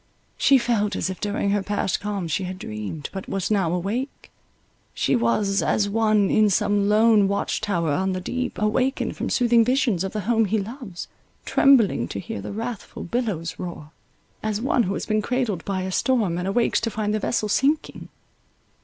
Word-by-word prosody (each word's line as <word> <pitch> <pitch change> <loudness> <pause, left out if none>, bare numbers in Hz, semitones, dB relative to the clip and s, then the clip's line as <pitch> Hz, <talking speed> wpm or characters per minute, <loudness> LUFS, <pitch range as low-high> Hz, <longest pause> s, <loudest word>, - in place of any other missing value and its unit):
She 275 - +5
felt 220 -5 0
as 190 - -1
if 185 - -8
during 205 -1 -1
her 205 0 +1
past 200 -2 -1
calm 205 -4 -3
she 175 +4 -1
had 185 +1 -5
dreamed, 105 - -6
but 190 -1 -6
was 195 +1 -2
now 190 -6 +2
awake; 205 +10 -3 0.6
she - - +1
was 205 -4 +1
As 205 - +1
one 215 -1 +2
In 215 -1 +4
some 205 +1 +2
lone 215 -1 +5
watch 200 +1 -1
tower 175 -7 0
on 190 +5 0
the 185 - -2
deep, 250 +7 -3
awakened 250 +6 0
From - - -3
soothing 240 -2 +4
visions 240 -7 +1
of 190 - -3
the 215 - -3
home 225 +2 +2
he 215 +2 0
loves, 210 -2 -6 0.4
Trembling 240 - +4
to 100 - -5
hear 100 - -6
the - - -6
wrathful 225 +1 -6
billows 185 -6 -3
roar; 165 -4 -7 0.5
as 215 -1 -1
one 250 +1 +2
who 195 -2 -1
has - - -4
been 215 -1 +1
cradled 230 -7 -1
by 190 -2 -2
a 190 - -3
storm, 210 -6 +1
and 180 - -3
awakes 230 +5 +1
to - - -1
find 210 -1 -2
the 215 - 0
vessel 215 0 -1
sinking. 280 +8 0
205 Hz, 190 wpm, -23 LUFS, 190-230 Hz, 0.6 s, She